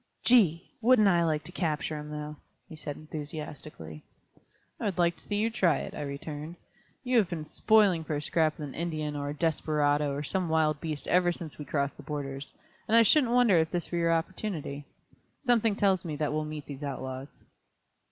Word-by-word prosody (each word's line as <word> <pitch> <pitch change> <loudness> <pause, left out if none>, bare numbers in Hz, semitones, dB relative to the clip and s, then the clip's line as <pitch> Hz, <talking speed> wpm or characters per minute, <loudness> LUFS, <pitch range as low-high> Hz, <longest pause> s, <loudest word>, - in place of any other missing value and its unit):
"Gee! 190 -9 +4
Wouldn't 235 -3 +5
I 175 -3 +4
like 155 -2 0
to - - -9
capture 155 -3 -1
'em, 150 0 -6
though!" 150 0 -6 0.3
he 160 - -10
said 150 -2 -6
enthusiastically. 150 - -7 0.8
"I - - -3
would 195 -3 -1
like 170 -1 +3
to - - -16
see 205 - -3
you 220 +2 +1
try 190 -8 +3
it," - - -6
I - - -5
returned; 150 +3 -6 0.5
"you 250 -1 +2
have 195 -5 +1
been 165 -4 -4
'spoiling' 200 -2 +3
for 155 - -3
a 145 - -2
scrap 155 -1 +1
with 150 - -5
an 135 - -9
Indian, 155 -3 -3
or 145 0 -3
a - - -3
desperado, 150 -2 +1
or 140 +1 -3
some 180 +3 -1
wild 155 -2 +2
beast 155 -3 -1
ever 180 0 +3
since 165 -3 -5
we 150 - -6
crossed 140 0 -1
the - - -9
borders, 140 -1 -5 0.4
and 225 +1 +5
I 230 - +8
shouldn't 245 +1 +4
wonder 245 -7 +5
if 160 0 +1
this 175 -2 -3
were 175 - 0
your 170 0 +2
opportunity. 165 -4 -2 0.6
Something 230 -4 +3
tells 195 -3 +2
me 155 -3 -4
that 150 0 -1
we'll 155 0 -1
meet 150 -1 -6
these 140 0 -8
outlaws." 130 0 -6
155 Hz, 200 wpm, -29 LUFS, 150-180 Hz, 0.8 s, I